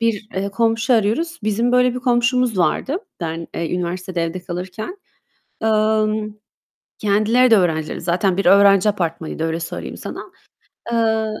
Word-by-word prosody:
bir, 220 -2 -1
eee, 195 +1 -1
komşu 225 +4 +1
arıyoruz. 235 +11 0
Bizim 220 +3 0
böyle 250 0 +3
bir - - -3
komşumuz 245 -2 +1
vardı 265 - +1 0.2
ben, 165 0 -4
eee, 165 +1 -2
üniversitede 180 0 -3
evde 165 +2 -4
kalırken. 185 - -6 0.6
Emm, 215 -1 +1 0.6
kendileri 215 +5 +3
de 225 - +7
öğrenciydi 160 -5 0
zaten. 180 +2 0
Bir 195 - -1
öğrenci 200 +1 +6
apartmanıydı 165 -5 -2
öyle 165 +1 -2
söyleyeyim 165 - -6
sana. - - -7 0.7
Eee, 220 -1 +1
210 Hz, 135 wpm, -20 LUFS, 180-230 Hz, 0.7 s, de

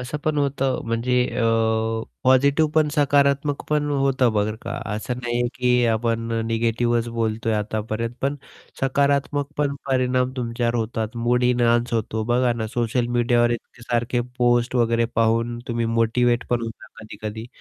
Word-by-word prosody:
असं 125 +4 -4
पण 155 -1 +1
होतं. 135 -2 0
म्हणजे 115 +2 0 0.2
अ, 120 - +1 0.8
पॉझिटिव 140 +4 +4
पण, 155 -1 +4
सकारात्मक 140 -1 +2
पण 150 -1 +1
होतं 135 -4 +2
बरं 105 +1 0
का. - - -5 0.2
असं 110 +4 -3
नाही 120 0 -2
आहे, 120 - +1
की 125 -1 +2
आपण 115 0 0
अ, 115 - 0
निगेटिव्हच 115 +1 0
बोलतोय 115 -1 -1
आतापर्यंत, 110 +2 -3
पण 140 +2 0 0.4
सकारात्मक 140 +1 +1
पण 145 -1 0
परिणाम 130 -1 +1
तुमच्यावर 120 -1 -1
होतात. 115 0 -2
मूड 120 +1 +1
एनहान्स 120 -1 +2
होतो, 110 -1 -1
बघा 120 +1 +2
ना. 115 -2 -3
सोशल 120 +2 -1
मीडियावर 120 0 +3
इतके 120 0 -6
सारखे 120 +1 0 0.2
पोस्ट 120 0 +2
वगैरे 115 0 +2
पाहून 115 +1 +1
तुम्ही 115 -1 -1
मोटिव्हेट 115 +1 +1
पण 120 -1 +1
होता. 115 -1 -7
कधी-कधी, 110 +1 -7
120 Hz, 150 wpm, -23 LUFS, 115-130 Hz, 0.8 s, पॉझिटिव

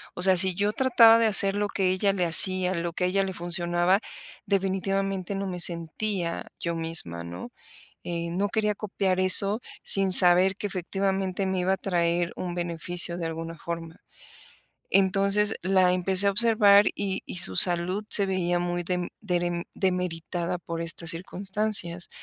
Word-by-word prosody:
O - - -7
sea, 190 -1 +4
si 185 0 +6
yo 205 +3 -1
trataba 235 -3 +4
de 230 - +2
hacer 195 -1 +4
lo 205 0 -2
que 190 -1 -2
ella 195 +2 -1
le 185 -2 -2
hacía, 185 +2 +7
lo 170 0 -5
que 180 - -5
a - - 0
ella 195 +2 -1
le 190 -1 -6
funcionaba, 175 +1 -1 0.5
definitivamente 195 0 -3
no 195 0 -5
me 180 -1 -6
sentía 170 +1 -2
yo 170 -1 -4
misma, 160 - -2
¿no? 85 +1 -9 0.6
Eh, 170 -1 -5
no 195 +4 -2
quería 210 0 -2
copiar 195 -2 -3
eso 195 +3 +5 0.2
sin 195 -1 +3
saber 180 +1 +5
que 205 - -5
efectivamente 195 0 -4
me 190 -1 -3
iba 185 +1 -1
a - - -3
traer 175 -2 -2
un 175 -1 -6
beneficio 175 0 0
de 170 - -6
alguna 165 +1 -8
forma. 165 +1 -8 0.9
Entonces, 200 +2 +2
la 185 0 +1
empecé 185 +2 +2
a - - 0
observar 210 -2 +3
y 195 -1 -4
y - - -8
su 95 - +3
salud 180 - +2
se 200 - +4
veía 175 -2 -2
muy 175 0 -4
dem 180 0 -4
derem 175 -3 -3
demeritada 180 -1 -4
por 170 -1 -8
estas 165 0 -2
circunstancias. 185 0 -3
185 Hz, 165 wpm, -24 LUFS, 175-195 Hz, 0.9 s, hacía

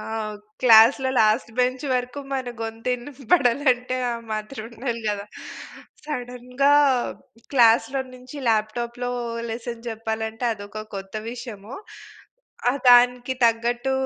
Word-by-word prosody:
ఆ! - - -7 0.6
క్లాస్‌లో 245 +3 +6
లాస్ట్‌బెంచ్ 250 +4 +1
వరకు 250 +2 -2
మన 260 -2 -2
గొంతు 225 +1 -5
వినపడాలంటే 255 -1 +1
ఆ - - -1 0.2
మాత్రం 215 +2 -5
ఉండాలి 235 0 -4
కదా! 205 -1 -2 0.8
సడెన్‌గా 250 0 -1 0.8
క్లాస్‌లో 255 +2 +4
నుంచి 255 +3 -12
ల్యాప్‌టాప్‌లో 235 +3 -1 0.4
లెసన్ 235 +1 -6
చెప్పాలంటే 220 +1 -4
అదొక 205 0 -8
కొత్త 195 +1 -9 0.2
విషయము. 230 -2 -8 1.0
ఆహ్, 275 - -2
దానికి 245 +1 +5
తగ్గట్టు 240 +3 +1
240 Hz, 100 wpm, -23 LUFS, 225-255 Hz, 1.0 s, క్లాస్‌లో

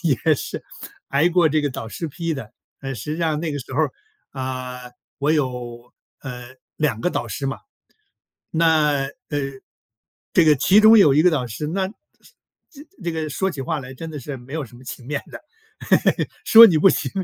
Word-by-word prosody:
也 155 -1 +2
是 - - -6 0.4
挨 145 +5 +3
过 170 -2 +3
这 155 +1 +2
个 145 - 0
导 115 -3 -6
师 165 +8 -5
批 165 +3 -3
的。 130 -8 -7 0.3
呃， 135 0 -5
实 125 +6 -5
际 160 - -4
上 160 -3 0
那 160 -1 -3
个 145 - -3
时 125 - -9
候 - - +1
儿， - - +1 0.4
啊， 130 -2 -6 0.3
我 145 +2 +1
有， 125 -5 -3 0.3
呃， 125 -1 -9 0.2
2 150 -8 0
个 180 - +1
导 120 - -3
师 115 - -5
嘛。 135 0 -2 0.9
那， 155 -4 +3
呃， 135 - -6 1.2
这 170 - +4
个 150 - +7
其 195 +10 +5
中 220 +1 +8
有 150 -9 +6
一 150 - +5
个 180 - +5
导 135 -6 -1
师， 115 +6 -5
那 190 +4 -1
是 205 - -14 0.8
这 285 -5 -15 0.2
这 170 - -1
个 160 -1 -3
说 190 +6 -1
起 145 -6 -7
话 155 +1 -2
来 130 0 -9
真 160 +5 -8
的 150 - -6
是 135 +1 -7
没 125 +5 -11
有 160 - -2
什 120 -1 -15
么 - - -15
情 125 -1 -9
面 145 0 -3
的， - - -8 1.1
说 230 +1 +10
你 170 -7 +3
不 195 - +6
行， - - 0
150 Hz, 210 characters per minute, -22 LUFS, 130-165 Hz, 1.2 s, 说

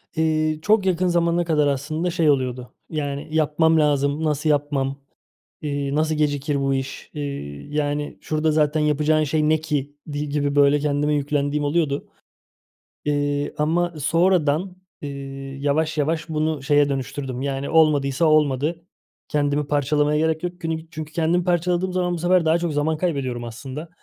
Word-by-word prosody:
Eee, 155 -1 +1
çok 210 +1 +3
yakın 185 0 +2
zamana 170 0 +2
kadar 150 -3 +2
aslında 155 +5 -1
şey 165 -3 +2
oluyordu. 125 -3 -1 0.2
Yani 145 -1 -3
"Yapmam 160 +1 +3
lazım, 145 0 +1
nasıl 150 0 0
yapmam!", 140 -2 0 0.6
iii, 145 -1 -2
"Nasıl 155 0 +1
gecikir 145 -1 0
bu 135 0 +1
iş!", 135 0 -4
iii, 140 - -6
yani 145 0 -1
"Şurada 155 0 0
zaten 150 0 +2
yapacağın 150 +1 +2
şey 150 +1 +1
ne 155 0 +3
ki?" 145 -2 -3
idi 145 -1 -4
gibi, 145 0 -1
böyle 145 0 +5
kendime 150 0 0
yüklendiğim 145 0 0
oluyordu, 145 -2 0 1.0
eee, 145 0 0
ama 170 +3 +1
sonradan, 170 +2 +2 0.3
eee, 145 - -4 0.5
yavaş 155 +3 0
yavaş 160 +2 -1
bunu 155 -2 -1
şeye 145 0 +3
dönüştürdüm: 135 -1 -4
Yani 135 0 -2
"Olmadıysa 155 -2 +3
olmadı. 155 +2 +2 0.4
Kendimi 145 -1 0
parçalamaya 150 +1 +1
gerek 160 +1 0
yok." 175 0 -4
Günü 160 0 -4
çünkü 155 -2 -7
kendimi 170 +2 +1
parçaladığım 180 +1 0
zaman 180 -1 0
bu 175 - -2
sefer 175 0 +2
daha 160 +2 +4
çok 170 -3 -2
zaman 155 +2 0
kaybediyorum 135 -8 -2
aslında. 135 +7 -7
150 Hz, 150 wpm, -22 LUFS, 145-160 Hz, 1.0 s, böyle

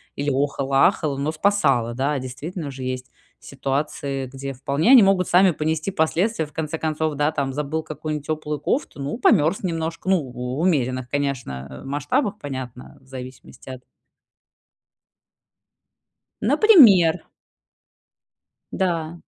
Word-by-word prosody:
или 145 +1 -2
охала, 135 0 +2
ахала, 145 -3 -2
но 145 +3 -1
спасала. 150 - +1
Да, 140 +3 0
действительно, 145 +5 -6
же 130 -1 -8
есть 130 0 -4 0.3
ситуации, 140 0 -3
где 135 +1 -7
вполне 140 - +1
они 255 -5 +9
могут 195 -2 +3
сами 185 +1 +5
понести 155 +3 -2
последствия. 175 +3 0
В 150 - -18
конце 160 0 -3
концов, 155 -1 -2
да, 145 +1 +1
там, 135 -1 -2
забыл 150 +3 -3
какую-нибудь 155 -1 -5
теплую 150 -2 -3
кофту, 150 - -2
ну, 140 +9 -3
померз 195 -7 +3
немножко, 165 0 -3
ну, 190 -4 +3
в 125 +3 -5
умеренных, 130 -7 0
конечно, 115 - -4
масштабах, 145 - -1
понятно, 130 -3 -8
в - - -25
зависимости 130 -1 -11
от 130 -1 -9 2.6
Например. 225 - +6 1.5
Да. 165 -4 -1
150 Hz, 125 wpm, -22 LUFS, 135-165 Hz, 2.6 s, они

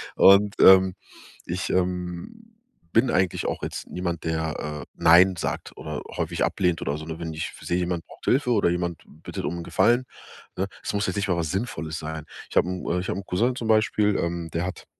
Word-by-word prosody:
Und, 100 +1 +6
ähm, 95 -1 +7 0.5
ich, 90 +2 -3
ähm, 90 - -3 0.4
bin 120 +2 +4
eigentlich 95 -4 +1
auch - - -3
jetzt - - -5
niemand, 85 -2 -3
der, 80 -2 -3
äh, - - -12 0.2
nein 90 +3 +7
sagt - - -4
oder - - -5 0.2
häufig - - -1
ablehnt 90 -3 0
oder 70 +1 -2
so, 80 - -8
ne? 80 0 -6
Wenn 80 -1 -4
ich 80 - -4
seh, 85 - -1
jemand 90 -2 -2
braucht - - -15
Hilfe 125 -1 +2
oder 105 -6 +3
jemand 85 -1 -2 0.2
bittet - - -5
um 85 +4 -2
'n - - -5
Gefallen, 120 +7 +3 0.5
ne 95 +1 0 0.2
es - - -2
muss 100 -1 0
jetzt 95 - -2
nicht 100 -1 -1
mal 90 - +2
was 80 -3 -1
Sinnvolles 80 -6 -3
sein. 80 0 -6 0.2
Ich - - -4
hab - - +5
'n 90 -1 -2
ich 95 - -4
hab - - -1
'n 100 - -5
Cousin 120 +7 +1
zum 115 -3 -4
Beispiel, 110 -1 +3
ähm, 85 -1 -2
der 85 +2 -1
hat 90 - -6
90 Hz, 210 wpm, -25 LUFS, 85-100 Hz, 0.5 s, ähm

